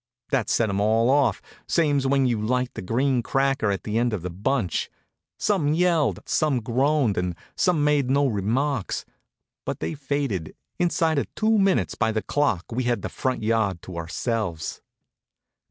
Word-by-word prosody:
That - - +1
set 115 - +2
'em 100 -1 -1
all 115 +4 +3
off, 140 0 +2 0.2
same's 145 -5 +2
when 135 0 +3
you 120 -4 0
light 125 +3 0
the - - -6
green 125 +6 +1
cracker 135 -3 +1
at 100 -1 -2
the 110 +1 -1
end 120 -1 +1
of 95 -6 -3
the 90 - -4
bunch. 105 +2 -1 0.5
Some 155 -8 +1
yelled, 170 -3 +2
some 150 -5 +1
groaned, 130 -1 +1
and 90 -1 -2 0.2
some 175 -5 +2
made 145 -3 +2
no 140 +2 +3
remarks. 120 +3 -1 0.6
But - - -4
they - - -3
faded. 140 - -3 0.2
Inside 165 -3 +2
of - - -2
two 220 +1 +2
minutes 195 -1 +2
by 110 -1 0
the 110 -1 -2
clock 140 -12 0
we 125 +2 -1
had 120 -5 0
the 95 - -3
front 130 +3 -2
yard 105 -5 0
to 90 - -8
ourselves. 85 +1 -3
125 Hz, 170 wpm, -24 LUFS, 105-145 Hz, 0.6 s, all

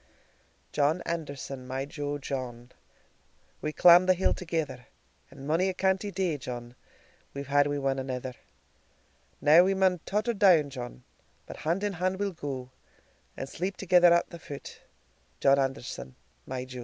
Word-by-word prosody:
John 150 +4 +1
Anderson, 140 -5 -5
my 130 +1 -3
jo 145 0 -4
John, 125 -3 -6 0.9
We 155 - -2
clamb 175 +3 +7
the 185 - +5
hill 190 - +2
thegither, 155 -8 -4 0.4
And 135 0 -11
monie 170 +5 +2
a 185 - -3
canty 190 +2 +1
day, 180 -6 -1
John, 120 -1 -7 0.6
We've 140 0 -4
had 145 +1 +3
wi' 140 -2 0
ane 135 - -2
anither; 130 -1 -4 1.1
Now 160 +4 +7
we 195 +1 +2
maun 190 -2 +2
totter 215 +4 0
down, 180 -9 +4
John, 120 - -8 0.4
But - - -9
hand 170 +6 -1
in 205 -1 0
hand 185 +1 -1
we'll 200 -1 0
go, 135 -6 -6 0.7
And 135 - -4
sleep 185 +7 -4
thegither 180 -2 +5
at 170 0 +3
the 170 - -9
foot, 140 -3 -9 0.6
John 140 0 +4
Anderson, 135 - -3 0.3
my 130 -1 -4
jo. 130 -1 -8
145 Hz, 155 wpm, -28 LUFS, 135-180 Hz, 1.1 s, clamb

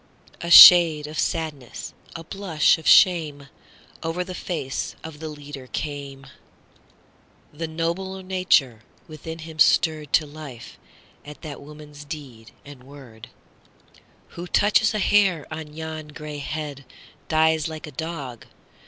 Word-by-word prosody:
A 170 - -5
shade 170 -4 +9
of 155 +1 -6
sadness, 155 -7 -4 0.2
a 165 - -7
blush 165 -4 +1
of 160 - -8
shame, 150 -6 +4 0.5
Over 165 +2 -3
the 185 0 -8
face 160 -7 -5
of 160 -2 -10
the 160 0 -6
leader 145 -3 -10
came; 140 -1 -6 1.3
The 165 +2 -5
nobler 170 +4 -4
nature 180 - +1 0.3
within 160 +1 -9
him 160 -1 -11
stirredTo 155 -1 +2
life 135 -7 -11 0.4
at 150 0 -13
that 150 -3 -8
woman's 150 0 -12
deed 135 -7 -10 0.2
and 140 -3 -13
word:"Who 135 +6 -16
touches 210 +3 +2
a - - +1
hair 195 -6 +2
of 155 -1 -7
yon 155 0 -7
gray 150 -1 -8
headDies 155 +2 -3
like 160 0 -8
a 150 - -10
dog! 145 -5 -7
155 Hz, 120 wpm, -23 LUFS, 145-165 Hz, 1.3 s, shade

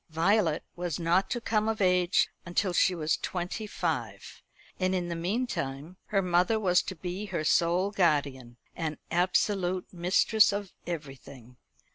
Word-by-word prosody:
Violet 165 0 +2
was 175 -3 -3
not 175 +3 +2
to 240 - -1
come 220 -1 0
of 225 - -2
age 180 -2 +3 0.2
until 180 +1 -1
she 180 +1 +3
was 155 -2 0
twenty 185 +4 -4
five, - - -4 0.4
and 185 0 +1
in 175 -1 -2
the 170 - -3
meantime 170 - -3
her 195 -2 +1
mother 180 +5 +2
was 180 -4 +3
to 190 - -6
be 180 +4 -5
her 175 -5 -3
sole 175 +5 +2
guardian, 140 - 0 0.2
and 160 -2 -3
absolute 185 +1 0
mistress 185 +5 +3
of 200 -1 -4
everything. 135 -6 -8
180 Hz, 145 wpm, -28 LUFS, 165-195 Hz, 0.4 s, age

